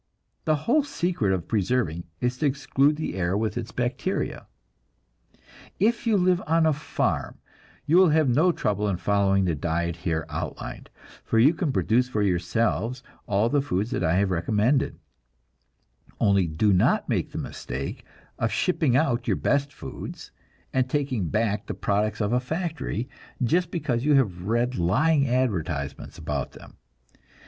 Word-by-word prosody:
The 155 Hz, -, +3 dB
whole 300 Hz, +6 st, +4 dB
secret 175 Hz, -, -1 dB
of 95 Hz, -3 st, -2 dB
preserving 100 Hz, -6 st, 0 dB, 0.2 s
is 125 Hz, +1 st, -1 dB
to 150 Hz, -, +2 dB
exclude 140 Hz, +1 st, +2 dB
the 155 Hz, -, -4 dB
air 90 Hz, +1 st, 0 dB
with 110 Hz, 0 st, -1 dB
its -, -, -4 dB
bacteria. -, -, -2 dB, 1.3 s
If 230 Hz, +4 st, +1 dB
you 220 Hz, -2 st, +4 dB
live 180 Hz, -1 st, +3 dB
on 165 Hz, +1 st, +3 dB
a 160 Hz, -, +4 dB
farm, 150 Hz, +2 st, -2 dB, 0.5 s
you 165 Hz, -, +4 dB
will 185 Hz, -2 st, +7 dB
have 155 Hz, -1 st, +3 dB
no 150 Hz, +9 st, +4 dB
trouble 105 Hz, -, -1 dB
in 95 Hz, -3 st, 0 dB
following 100 Hz, 0 st, +2 dB
the 85 Hz, -, +1 dB
diet 85 Hz, +3 st, -2 dB
here 80 Hz, -2 st, -2 dB
outlined, -, -, -6 dB, 0.3 s
for 115 Hz, -, 0 dB
you 135 Hz, +8 st, +6 dB
can 165 Hz, -3 st, -1 dB
produce 125 Hz, 0 st, +2 dB
for 105 Hz, -4 st, 0 dB
yourselves 110 Hz, +6 st, 0 dB, 0.2 s
all 105 Hz, +3 st, +2 dB
the 145 Hz, +3 st, +2 dB
foods 115 Hz, -5 st, -2 dB
that 95 Hz, -, -1 dB
I 80 Hz, 0 st, +2 dB
have 95 Hz, 0 st, +2 dB
recommended; 105 Hz, -, +1 dB, 1.2 s
only 100 Hz, -3 st, +3 dB
do 90 Hz, +7 st, +2 dB
not 90 Hz, -, +3 dB
make -, -, -1 dB
the -, -, -6 dB
mistake 70 Hz, +3 st, -5 dB, 0.4 s
of -, -, 0 dB
shipping 155 Hz, -8 st, +2 dB
out 130 Hz, -5 st, +1 dB
your -, -, +2 dB
best 140 Hz, 0 st, +1 dB
foods, -, -, -8 dB, 0.4 s
and 130 Hz, -1 st, +1 dB
taking 130 Hz, -, -1 dB
back 105 Hz, +5 st, 0 dB
the -, -, -4 dB
products 105 Hz, +2 st, 0 dB
of 105 Hz, +2 st, 0 dB
a 125 Hz, -, +3 dB
factory, 160 Hz, -, -3 dB, 0.4 s
just 170 Hz, +8 st, +2 dB
because 140 Hz, -9 st, -1 dB
you 150 Hz, 0 st, +4 dB
have 95 Hz, -9 st, +1 dB
read 120 Hz, 0 st, 0 dB
lying 140 Hz, -, +3 dB
advertisements 85 Hz, -, -2 dB
about 75 Hz, -4 st, -3 dB
them. -, -, -14 dB
120 Hz, 155 wpm, -25 LUFS, 95-145 Hz, 1.3 s, will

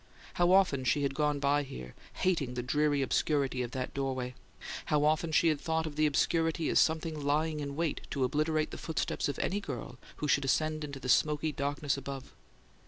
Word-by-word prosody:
How 175 Hz, 0 st, +3 dB
often 185 Hz, -9 st, +4 dB
she 145 Hz, +3 st, +2 dB
had 140 Hz, -1 st, 0 dB
gone 150 Hz, +1 st, +1 dB
by 140 Hz, +1 st, +2 dB
here, 65 Hz, -, -8 dB, 0.2 s
hating 155 Hz, -9 st, 0 dB
the 125 Hz, -, -2 dB
dreary 145 Hz, +2 st, +2 dB
obscurity 135 Hz, -1 st, +1 dB
of 120 Hz, -, -2 dB
that 130 Hz, -1 st, -3 dB
stairway; 130 Hz, -2 st, -2 dB, 0.5 s
how 150 Hz, -1 st, +2 dB
often 155 Hz, +2 st, +2 dB
she 165 Hz, +2 st, +4 dB
had 150 Hz, -2 st, 0 dB
thought 160 Hz, -1 st, 0 dB
of 155 Hz, -2 st, -6 dB
this 155 Hz, 0 st, +3 dB
obscurity 165 Hz, +2 st, +1 dB
as -, -, +4 dB
something 160 Hz, -1 st, +1 dB
lying 150 Hz, +2 st, +1 dB
in 140 Hz, -1 st, -4 dB
wait 165 Hz, 0 st, -1 dB
to 135 Hz, -, -1 dB
obliterate 155 Hz, +3 st, +1 dB
the -, -, -7 dB
footsteps 160 Hz, -2 st, -2 dB
of 140 Hz, -, -3 dB
any 200 Hz, -, 0 dB
girl 125 Hz, -, -6 dB, 0.2 s
who 150 Hz, -, -3 dB
should 140 Hz, -1 st, +3 dB
ascend 155 Hz, +3 st, +1 dB
into 140 Hz, -2 st, -6 dB
the 130 Hz, -, -6 dB
smoky 150 Hz, +4 st, +3 dB
darkness 145 Hz, 0 st, -1 dB
above! 135 Hz, -1 st, -7 dB
145 Hz, 195 wpm, -31 LUFS, 135-155 Hz, 0.5 s, often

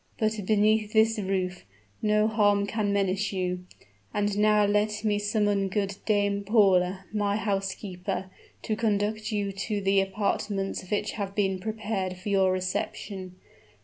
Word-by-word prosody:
"But 215 Hz, 0 st, 0 dB
beneath 215 Hz, 0 st, +3 dB
this 220 Hz, 0 st, +4 dB
roof, 185 Hz, -2 st, -2 dB, 0.4 s
no 210 Hz, 0 st, +3 dB
harm 205 Hz, -2 st, +3 dB
can 205 Hz, -1 st, -1 dB
menace 200 Hz, 0 st, 0 dB
you. 180 Hz, -1 st, -2 dB, 0.5 s
And 205 Hz, -1 st, +1 dB
now 210 Hz, 0 st, +4 dB
let 210 Hz, +1 st, +1 dB
me 210 Hz, -1 st, +1 dB
summon 205 Hz, -1 st, +1 dB
good 200 Hz, 0 st, -1 dB
Dame 200 Hz, -1 st, +1 dB
Paula, 195 Hz, -3 st, +3 dB
my 205 Hz, -1 st, +1 dB
housekeeper, 195 Hz, -2 st, -3 dB, 0.3 s
to 215 Hz, -, -1 dB
conduct 215 Hz, 0 st, 0 dB
you 205 Hz, -2 st, -1 dB
to 205 Hz, +2 st, -3 dB
the 195 Hz, 0 st, +3 dB
apartments 195 Hz, -1 st, -2 dB
which 210 Hz, 0 st, 0 dB
have 200 Hz, -2 st, -5 dB
been 195 Hz, -2 st, +1 dB
prepared 205 Hz, -3 st, -3 dB
for 185 Hz, +3 st, -6 dB
your 190 Hz, -2 st, +3 dB
reception. 185 Hz, 0 st, -3 dB
205 Hz, 140 wpm, -27 LUFS, 195-210 Hz, 0.5 s, this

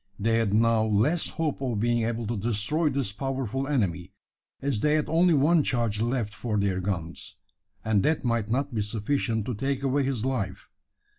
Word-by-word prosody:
They 115 Hz, +2 st, +2 dB
had 110 Hz, -3 st, +1 dB
now 115 Hz, +1 st, +3 dB
less 110 Hz, +11 st, +2 dB
hope 155 Hz, -4 st, -2 dB
of 120 Hz, -6 st, -1 dB
being 120 Hz, +1 st, +1 dB
able 115 Hz, 0 st, -2 dB
to 115 Hz, +2 st, -2 dB
destroy 120 Hz, -, 0 dB
this 135 Hz, -6 st, -1 dB
powerful 135 Hz, +2 st, -3 dB
enemy: 95 Hz, -, -1 dB, 0.5 s
as 135 Hz, -6 st, -1 dB
they 150 Hz, +6 st, +2 dB
had 155 Hz, -, 0 dB
only 165 Hz, +2 st, +4 dB
one 155 Hz, +4 st, +4 dB
charge 115 Hz, -6 st, 0 dB
left 115 Hz, -3 st, -1 dB
for 110 Hz, -2 st, -2 dB
their 100 Hz, -2 st, +1 dB
guns, 85 Hz, -4 st, -4 dB, 0.5 s
and 110 Hz, -2 st, +3 dB
that 155 Hz, +4 st, +1 dB
might 115 Hz, -3 st, 0 dB
not 135 Hz, +3 st, -1 dB
be 110 Hz, -, 0 dB
sufficient 110 Hz, +1 st, -1 dB
to 125 Hz, -, -2 dB
take 135 Hz, +4 st, -2 dB
away 135 Hz, +1 st, +2 dB
his 130 Hz, -4 st, -1 dB
life. 110 Hz, -8 st, -3 dB
115 Hz, 180 wpm, -27 LUFS, 105-135 Hz, 0.5 s, only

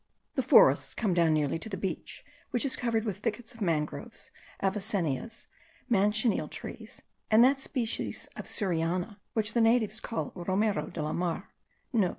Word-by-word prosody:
The -, -, +1 dB
forests -, -, +5 dB
come 210 Hz, -6 st, +1 dB
down 170 Hz, -2 st, +4 dB
nearly 150 Hz, +1 st, 0 dB
to 220 Hz, -, -6 dB
the 195 Hz, -, -4 dB
beach, 190 Hz, +1 st, -5 dB, 0.2 s
which 245 Hz, +2 st, 0 dB
is 270 Hz, -, +1 dB
covered 230 Hz, -2 st, 0 dB
with 200 Hz, -3 st, -3 dB
thickets 225 Hz, +2 st, -3 dB
of 230 Hz, -, -15 dB
mangroves, 155 Hz, -5 st, -2 dB, 0.3 s
avicennias, 195 Hz, -, -1 dB, 0.5 s
manchineel 215 Hz, +2 st, +2 dB
trees, -, -, -8 dB, 0.3 s
and 220 Hz, +2 st, +7 dB
that 270 Hz, +2 st, +4 dB
species 250 Hz, -4 st, -2 dB
of -, -, -7 dB
suriana 180 Hz, +2 st, -1 dB
which 220 Hz, -1 st, 0 dB
the 235 Hz, -, +3 dB
natives 225 Hz, -2 st, +3 dB
call 230 Hz, -, -3 dB
romero 195 Hz, +4 st, 0 dB
de 170 Hz, -5 st, -4 dB
la 155 Hz, +1 st, -2 dB
mar. 180 Hz, +2 st, -2 dB
210 Hz, 155 wpm, -29 LUFS, 180-225 Hz, 0.5 s, and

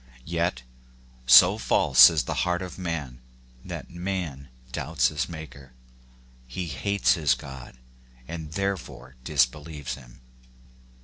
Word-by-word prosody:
Yet, 85 Hz, -7 st, -2 dB, 0.6 s
so 90 Hz, -, +8 dB
false -, -, +6 dB
is 80 Hz, -5 st, 0 dB
the -, -, -4 dB
heart 90 Hz, 0 st, -1 dB
of 90 Hz, +1 st, -9 dB
man, 75 Hz, -8 st, -5 dB, 0.4 s
that -, -, -8 dB
man 85 Hz, -6 st, -5 dB, 0.2 s
doubts -, -, 0 dB
his 75 Hz, +2 st, -3 dB
Maker. 70 Hz, -5 st, -10 dB, 0.7 s
He 90 Hz, +9 st, -5 dB
hates 85 Hz, +8 st, +1 dB
his 80 Hz, -6 st, +2 dB
God, 65 Hz, -3 st, -11 dB, 0.5 s
and 80 Hz, -1 st, -7 dB
there 100 Hz, +1 st, -1 dB
fore 65 Hz, -5 st, -12 dB
disbelieves 75 Hz, +1 st, -1 dB
him. 65 Hz, -2 st, -13 dB
75 Hz, 120 wpm, -25 LUFS, 65-85 Hz, 0.7 s, so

